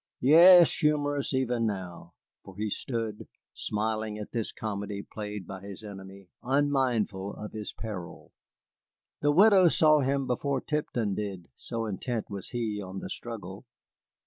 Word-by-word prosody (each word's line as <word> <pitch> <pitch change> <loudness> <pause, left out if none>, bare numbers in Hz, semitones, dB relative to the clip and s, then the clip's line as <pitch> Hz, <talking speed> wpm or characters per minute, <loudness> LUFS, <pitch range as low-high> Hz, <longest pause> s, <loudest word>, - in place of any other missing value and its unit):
Yes, 170 +5 +8
humorous 145 -2 +1
even 125 -3 0
now, 95 -4 -6 0.3
for 95 -1 -13
he 105 0 -2
stood, 115 -3 -4 0.3
smiling 110 0 -2
at 105 - -7
this 115 -3 -2
comedy 100 -1 -5
played 105 -3 -7
by 95 +1 -8
his 100 +1 -9
enemy, 95 -2 -10
unmindful 125 -8 0
of 105 - -8
his 110 -1 -5
peril. 100 -6 -8 0.9
The 145 - +3
widow 190 +2 +6
saw 155 -2 +5
him 135 0 0
before 135 +2 -1
Tipton 120 -8 -2
did, 95 -4 -5
so 115 -1 -4
intent 110 +2 -4
was 100 -2 -5
he 110 -4 -3
on 95 0 -7
the - - -6
struggle. 110 -2 -7
110 Hz, 140 wpm, -28 LUFS, 100-135 Hz, 0.9 s, Yes